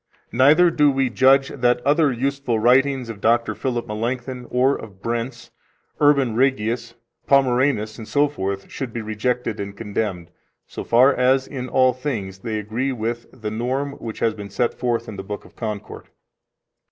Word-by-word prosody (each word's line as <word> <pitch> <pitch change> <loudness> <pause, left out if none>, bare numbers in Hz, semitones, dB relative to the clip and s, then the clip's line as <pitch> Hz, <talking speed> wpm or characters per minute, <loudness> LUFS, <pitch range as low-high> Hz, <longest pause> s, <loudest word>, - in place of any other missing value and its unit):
Neither 150 +8 +5
do 150 -2 +4
we 135 -2 0
judge 135 +2 +4
that 125 -2 +1
other 145 0 +3
useful 135 -1 -1
writings 130 +3 +3
of 110 -3 -8
Dr. 115 0 +2
Philip 120 +2 -3
Melanchthon, 120 +3 -4
or 130 +3 +2
of 100 -4 -10
Brenz, 120 +3 -4 0.5
Urban 140 -6 +3
Rhegius, 120 -2 0 0.3
Pomeranus, 130 -5 +2
etc., 110 -6 -1
should 130 -4 -6
be 115 - -4
rejected 110 +1 -2
and 100 0 -6
condemned, 100 -5 -3 0.3
so - - -7
far 125 +4 +5
as, 130 +1 +2
in 130 -2 -6
all 130 -1 +4
things, 115 -8 -4
they 110 0 -3
agree 110 +6 -2
with 120 -1 -3
the 110 -4 -6
norm 130 +5 -2
which 110 -1 -7
has 115 - +2
been 100 -2 -8
set 120 +4 0
forth 120 -2 -2
in 105 - -7
the 95 - -5
Book 105 +1 -7
of - - -18
Concord. 105 -3 -6
120 Hz, 160 wpm, -22 LUFS, 110-135 Hz, 0.5 s, Neither